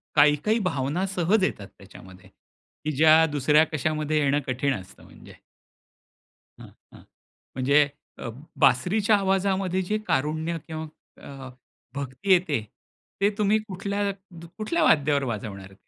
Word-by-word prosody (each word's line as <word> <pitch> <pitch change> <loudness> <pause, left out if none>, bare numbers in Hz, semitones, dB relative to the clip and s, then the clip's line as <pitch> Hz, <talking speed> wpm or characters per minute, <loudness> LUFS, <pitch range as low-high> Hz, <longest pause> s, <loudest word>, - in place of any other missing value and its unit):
काही-काही 150 +9 +4
भावना 165 -2 -1
सहज 190 +2 +1
येतात 100 - -2
त्याच्यामध्ये, 95 -1 -15
की 155 - -10
ज्या 160 +1 +6
दुसऱ्या 150 +2 +4
कशामध्ये 155 +1 -1
येणं 145 0 +2
कठीण 130 +2 0
असतं 95 - -17
म्हणजे. - - -15 1.3
हां, - - -12 0.2
हां - - -14 0.6
म्हणजे 140 +3 +4 0.4
अ, - - -5 0.3
बासरीच्या 180 - +3
आवाजामध्ये 190 -1 0
जे 210 +4 -1
कारुण्य 155 +4 -1
किंवा 160 0 -5 0.4
अ, 135 -2 -10 0.5
भक्ती 140 +8 -3
येते 170 -9 +1 0.6
ते 200 - +4
तुम्ही 210 0 +3
कुठल्या 200 +1 -2 0.5
कुठल्या 315 +10 0
वाद्यावर 145 -2 +3
वाजवणार. 100 -5 -6
155 Hz, 115 wpm, -25 LUFS, 135-190 Hz, 1.3 s, ज्या